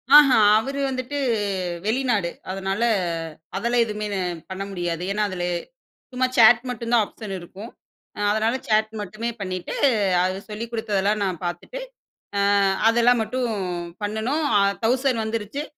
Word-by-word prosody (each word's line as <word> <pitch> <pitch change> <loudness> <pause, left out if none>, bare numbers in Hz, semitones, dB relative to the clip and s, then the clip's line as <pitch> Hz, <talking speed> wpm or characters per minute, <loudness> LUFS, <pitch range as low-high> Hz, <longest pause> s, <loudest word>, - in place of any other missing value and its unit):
ஆஹ, 295 -2 +9 0.3
அவரு 275 +5 -4
வந்துட்டு 260 +2 -4 0.7
வெளிநாடு. 220 -5 +1 0.2
அதனால 195 +2 -2 0.7
அதெல்லாம் 235 +4 +2
எதுவுமே 210 -1 -4
நான் 180 -3 -3
பண்ண 190 +1 -4
முடியாது. 175 -2 -3
ஏன்னா, 210 +1 0
அதுல 180 -1 -3 0.7
சும்மா 255 0 +1
சேட் 230 +1 +7
மட்டும் 235 -1 -4
தான் 230 -3 +5
ஆப்ஷன் 205 -3 -7
இருக்கும். 190 +6 -10 0.5
அ - - -7
அதனால 220 +3 +1
சேட் 215 0 +2
மட்டுமே 215 +4 -4
பண்ணிட்டு, 185 -2 -4 0.5
அது 185 0 0
சொல்லிக் 225 +2 -6
குடுத்ததெல்லாம் 210 -2 0
நான் 185 -3 -3
பார்த்துட்டு, 175 - -5 0.6
அ - - +2 0.5
அதெல்லாம் 235 +1 +4
மட்டும் 245 +1 -2 0.5
பண்ணணும். 220 +9 -1 0.2
அ - - +4 0.2
1000 250 0 +2
வந்துருச்சு. 220 +5 -3
220 Hz, 135 wpm, -23 LUFS, 195-240 Hz, 0.7 s, ஆஹ